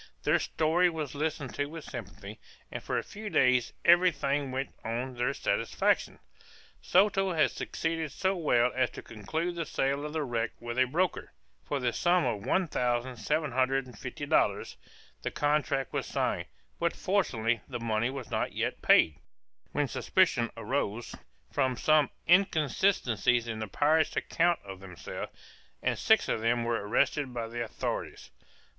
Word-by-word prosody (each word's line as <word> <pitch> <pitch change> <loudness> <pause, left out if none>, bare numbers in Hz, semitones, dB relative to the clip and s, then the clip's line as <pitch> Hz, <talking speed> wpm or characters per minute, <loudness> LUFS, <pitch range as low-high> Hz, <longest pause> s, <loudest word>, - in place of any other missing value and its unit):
Their - - +3
story 165 +3 +2
was 155 -5 -4
listened 150 -2 -3
to 145 - -1
with 160 +1 -8
sympathy, 105 -3 -8 0.3
and - - -5
for - - -2
a - - -1
few 210 +1 -7
days 125 - +3
every 175 +2 +7
thing 145 -2 -1
went 135 +1 -3
on 120 +3 -3
to - - -15
their 120 - +1
satisfaction. - - 0 0.6
Soto 195 0 +3
had 155 -6 +3
succeeded 160 -2 -3
so 190 +6 0
well 125 -8 +2
as 130 -1 +1
to - - -10
conclude 160 - -3
the 170 -1 -3
sale 140 -1 -1
of 150 0 -5
the 160 -1 -1
wreck 115 -3 -2
with 120 +1 -4
a 130 - +6
broker, 170 +6 -1 0.3
for 145 - -2
the 120 -2 0
sum 175 -2 +2
of 110 -5 -2
one 185 -2 +2
thousand 125 -2 -1
seven 150 +1 -1
hundred 130 +2 +1
and 125 -3 -13
fifty - - -6
dollars; - - +1 0.5
the - - -2
contract 145 -3 0
was - - -2
signed, - - -1 0.3
but 170 0 0
fortunately 120 - 0
the 120 -2 -5
money 115 0 0
was 130 -3 -7
not - - -1
yet - - -2
paid, 75 -2 +5 0.5
when 145 -1 0
suspicion 135 -8 +2
arose, 120 -4 -2 0.4
from 130 -3 +1
some 155 -2 +4 0.2
inconsistencies 155 - +3
in 110 -1 -4
the 110 - -3
pirates' 155 - +2
account 175 0 +2
of 95 -1 -8
themselves, 90 -3 -7 0.5
and - - 0
six - - +4
of 110 - -1
them 115 +1 +1
were 115 -3 -1
arrested 135 +5 +1
by 115 -1 -2
the 120 +1 -3
authorities. 115 - -5
135 Hz, 165 wpm, -29 LUFS, 120-160 Hz, 0.6 s, every